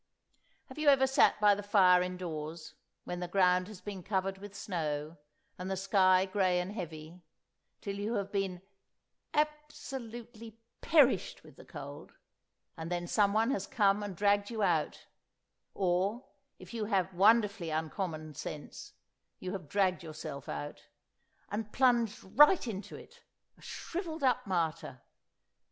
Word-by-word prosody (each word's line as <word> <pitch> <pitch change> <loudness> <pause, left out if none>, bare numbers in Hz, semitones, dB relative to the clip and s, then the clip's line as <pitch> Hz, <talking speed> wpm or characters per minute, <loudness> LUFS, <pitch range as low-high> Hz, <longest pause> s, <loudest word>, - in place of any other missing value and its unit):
Have 260 +2 -11
you 305 - -1
ever 270 -2 +6
sat 265 0 +4
by 210 -1 +6
the 205 - -3
fire 190 -3 +5
indoors, 170 -3 -5 0.3
when 180 - -5
the 180 - -3
ground 180 0 +3
has 205 -4 -11
been 195 -1 -6
covered 190 0 -2
with 200 0 -10
snow, 155 -5 -3 0.4
and 180 +1 -4
the 190 - -2
sky 190 -1 +4
grey 185 -2 +1
and 180 +2 -3
heavy, 165 -3 -7 0.6
till 200 -1 -4
you 215 +3 -2
have 200 -1 -2
been 190 -3 -2 0.7
"absolutely 240 -7 -4 0.2
perished 295 -6 +3
with - - -16
the - - -14
cold," - - -9 0.6
and 165 +1 -6
then 175 0 -1
someone 215 +5 +2
has 285 - -2
come 205 -5 +2
and 205 -2 -5
dragged 205 0 +2
you 225 -3 -2
out 165 -5 0 0.7
(or, 195 +6 0 0.3
if 185 +2 -13
you 225 -2 -2
have 190 -3 0
wonderfully 205 -1 +3
uncommon 155 0 -3
sense, 150 0 -8 0.4
you 185 - -5
have 185 -7 -6
dragged 190 -2 +1
yourself 155 -4 -7
out), 75 -1 -6 0.6
and 210 +1 -3
plunged 240 -5 +2
right 295 - +5
into 205 -2 -6
it—a - - -18
shrivelled 330 -3 -5
up 250 -5 +2
martyr! 165 -8 -2
195 Hz, 140 wpm, -32 LUFS, 180-220 Hz, 0.7 s, ever